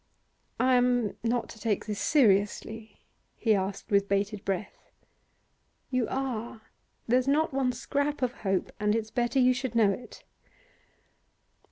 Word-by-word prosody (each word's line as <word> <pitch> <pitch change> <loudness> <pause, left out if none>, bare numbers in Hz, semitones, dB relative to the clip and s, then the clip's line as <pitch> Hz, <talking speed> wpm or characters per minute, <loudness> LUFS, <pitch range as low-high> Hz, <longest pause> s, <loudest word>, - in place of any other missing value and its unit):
'I 255 0 +3
am 245 -4 +1
not 235 0 0
to 220 - -11
take 215 -3 -1
this 210 -1 -4
seriously?' 220 -3 +1 0.4
he 220 - +2
asked 195 +2 -3
with 200 0 +3
bated 200 +1 -1
breath. 195 +1 -4 1.0
'You 255 -3 +1
are. 240 -4 -3 0.5
There's 250 +2 +2
not 300 +2 +2
one 265 -2 +1
scrap 285 +3 -2
of 250 - +1
hope, 190 -3 -1
and 210 0 +2
it's 220 -1 -3
better 240 +2 0
you 255 -1 +5
should 250 -1 -4
know 215 -3 +5
it. 240 +5 -8
230 Hz, 140 wpm, -28 LUFS, 210-255 Hz, 1.0 s, you